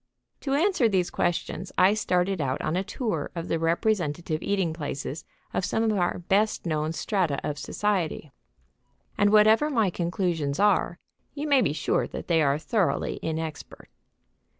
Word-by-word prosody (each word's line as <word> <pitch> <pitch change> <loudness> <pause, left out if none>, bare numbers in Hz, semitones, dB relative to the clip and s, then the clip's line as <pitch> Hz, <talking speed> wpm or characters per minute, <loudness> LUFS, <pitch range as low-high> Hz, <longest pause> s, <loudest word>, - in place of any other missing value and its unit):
To 275 -1 -1
answer 310 - +3
these 185 -3 0
questions 175 +1 -2
I 185 +2 +6
started 185 -3 0
out 135 -1 -1
on 160 - -1
a 185 - 0
tour 200 - -3
of 170 0 -4
the 165 - 0
representative 165 -2 0
eating 190 -5 0
places 145 -1 -5 0.3
of - - 0
some 220 +4 0
of 225 - +2
our 180 -4 0
best 195 +5 0
known 155 -1 -1
strata 170 -4 0
of 145 -1 -3
society, 180 -8 -2 0.8
and, 205 0 +3
whatever 215 +7 +5
my 225 -9 +2
conclusions 170 -5 -1
are, 200 -4 +2 0.4
you 290 +1 -3
may 280 -3 +5
be 145 - +1
sure 150 - 0
that - - -7
they 165 -2 +4
are 140 -1 +2
thoroughly 190 +4 0
inexpert. 160 -1 -5
180 Hz, 155 wpm, -26 LUFS, 160-210 Hz, 0.8 s, I